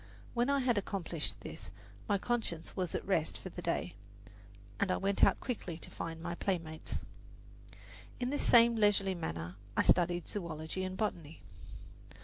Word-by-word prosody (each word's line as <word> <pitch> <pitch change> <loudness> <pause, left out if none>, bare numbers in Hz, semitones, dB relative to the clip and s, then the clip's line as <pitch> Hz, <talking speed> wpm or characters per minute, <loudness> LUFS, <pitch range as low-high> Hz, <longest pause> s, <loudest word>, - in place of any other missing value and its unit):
When 240 +2 +2
I 280 -1 +3
had 245 -4 +3
accomplished 180 -5 -3
this - - -8 0.4
my 205 - +4
conscience 205 -7 -2
was 180 -3 -1
at - - -2
rest 165 -5 +1
for - - -7
the - - -7
day, 85 +5 -1 0.9
and 200 - +2
I - - +2
went 195 0 +1
out - - +6
quickly 195 -10 -4
to - - -7
find 165 -1 -5
my 170 +1 -3
playmates. 165 -4 -2 1.2
In 250 +1 0
this 290 - 0
same 235 0 +7
leisurely 205 -3 +3
manner 85 - -4 0.2
I - - +5
studied 175 -1 +3
zoology 170 -1 -3
and 185 0 -3
botany. 165 - -3
185 Hz, 155 wpm, -34 LUFS, 165-210 Hz, 1.2 s, same